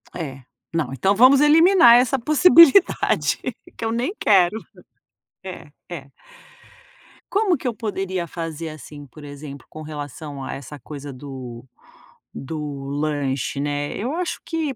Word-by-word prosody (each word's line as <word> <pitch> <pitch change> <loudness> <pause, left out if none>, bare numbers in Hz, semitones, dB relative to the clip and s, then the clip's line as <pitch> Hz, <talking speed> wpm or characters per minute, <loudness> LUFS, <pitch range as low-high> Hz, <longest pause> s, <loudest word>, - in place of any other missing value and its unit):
É. 135 -6 -6 0.3
Não, 155 -6 -1
então 195 +9 +1
vamos 260 +5 +6
eliminar 325 -3 +6
essa 250 +2 +3
possibilidade. 335 +5 +5 0.4
Que 230 - -4
eu 225 - -1
nem 245 - -2
quero. 190 -1 +3 0.9
É, 185 -5 -9 0.2
é. 145 -6 -8 1.2
Como 395 -4 +1
que 255 - -5
eu 240 - -1
poderia 190 -5 -3
fazer, 165 -1 -6
assim, 150 -1 -11
por 150 +4 -15
exemplo, 145 -1 -10
com 155 - -10
relação 145 -2 -8
a - - -5
essa 140 +2 -9
coisa 145 +2 -9
do 130 -3 -9 0.7
do 145 -1 -6
lanche, 145 -2 -2
né. 145 0 -3
Eu 245 +7 -3
acho 355 +1 -3
que, 320 -5 -3
160 Hz, 135 wpm, -22 LUFS, -, 1.2 s, vamos